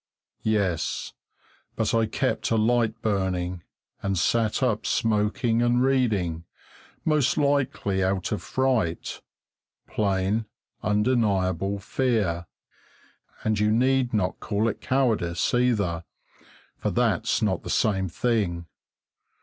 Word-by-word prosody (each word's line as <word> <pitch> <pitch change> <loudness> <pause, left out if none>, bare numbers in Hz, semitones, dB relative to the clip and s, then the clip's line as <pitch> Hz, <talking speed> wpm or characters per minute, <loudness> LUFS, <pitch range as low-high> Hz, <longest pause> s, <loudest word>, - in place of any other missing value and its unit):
Yes, 100 -7 -1 0.6
but - - 0
I 115 -1 +3
kept 130 +4 -1
a 115 - +2
light 115 0 +1
burning, 90 -4 -1 0.4
and 100 -1 -1
sat 110 +7 +1
up 115 -5 0
smoking 115 +1 +1
and 120 +1 +3
reading, 105 -12 +1 0.6
most 150 -4 +2
likely 140 -9 +1
out 95 -1 -1
of 105 - -1
fright; 125 -11 -1 0.6
plain, 100 +1 0 0.4
undeniable 100 -4 +1
fear, 100 -6 -1 1.0
and 110 -1 +1
you 105 0 +3
need 130 +2 +2
not 100 -5 0
call 105 +1 0
it 110 - -3
cowardice 110 -10 +1
either, 105 -9 +1 0.7
for - - -1
that's - - +1
not - - +1
the - - -8
same 95 -3 +1
thing. 95 -5 -1
105 Hz, 110 wpm, -25 LUFS, 95-120 Hz, 1.0 s, I